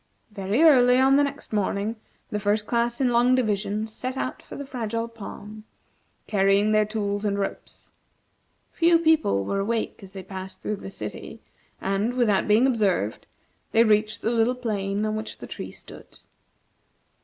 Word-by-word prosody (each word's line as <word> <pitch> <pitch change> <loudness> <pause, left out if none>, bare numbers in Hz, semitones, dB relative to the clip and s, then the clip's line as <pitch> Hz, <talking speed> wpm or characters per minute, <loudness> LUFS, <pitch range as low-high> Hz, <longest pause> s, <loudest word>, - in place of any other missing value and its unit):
Very 205 +7 0
early 250 -5 +6
on 265 +1 +5
the 285 - +5
next 280 -3 -5
morning, 205 +1 -1 0.4
the 210 - -1
First 210 +1 0
Class 235 +1 0
in 260 -2 +2
Long 245 +1 +4
Division 215 -3 0
set 255 +4 -6
out 255 - -3
for - - -11
the 280 - -6
Fragile 230 -3 -3
Palm, 215 -1 -10 0.6
carrying 200 +1 +3
their 215 -1 +3
tools 205 -1 -2
and 200 -1 0
ropes. 200 - -6 0.8
Few 335 0 +4
people 315 - +2
were 195 - -1
awake 225 +3 -2
as 195 -1 -12
they 190 -1 -7
passed 190 0 -8
through 210 - -3
the 195 - -8
city, - - -8 0.4
and, 200 +5 -1
without 220 -6 +2
being 215 +4 +5
observed, 200 - 0 0.5
they 225 - +6
reached 215 -1 +1
the 225 - +1
little 235 +1 +2
plain 205 -4 -2
on 215 0 -1
which 215 0 -5
the - - -9
tree - - -7
stood. - - -12
215 Hz, 165 wpm, -25 LUFS, 200-245 Hz, 0.8 s, early